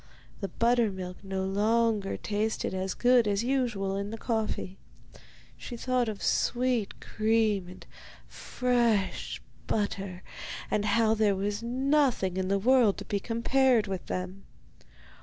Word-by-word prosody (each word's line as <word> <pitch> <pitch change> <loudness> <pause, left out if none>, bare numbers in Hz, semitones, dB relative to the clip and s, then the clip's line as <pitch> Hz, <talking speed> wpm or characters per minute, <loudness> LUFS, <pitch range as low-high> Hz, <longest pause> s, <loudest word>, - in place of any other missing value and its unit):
The 195 - -3
buttermilk 205 -6 0
no 190 -1 -3
longer 210 +1 +1
tasted 215 -1 -2
as 190 0 -2
good 245 -2 +4
as 205 +1 +1
usual 235 -7 0
in 200 +1 -3
the 225 - -6
coffee; 220 -5 -2 0.8
she 240 - -7
thought 250 -1 0
of 205 -3 -6
sweet 245 -4 0
cream 215 -3 +1
and 180 - -12 0.4
fresh 235 -6 0 0.3
butter, 195 -3 -2 0.5
and 210 -1 +1
of - - 0
how 220 +1 +3
there 215 -2 +2
was 205 +2 -2
nothing 255 -5 +1
in 190 0 -1
the 200 +1 +2
world 235 -1 +4
to - - -7
be 200 - -1
compared 240 +2 +2
with 190 -3 -5
them. 185 +2 -5
215 Hz, 135 wpm, -28 LUFS, 195-235 Hz, 0.8 s, good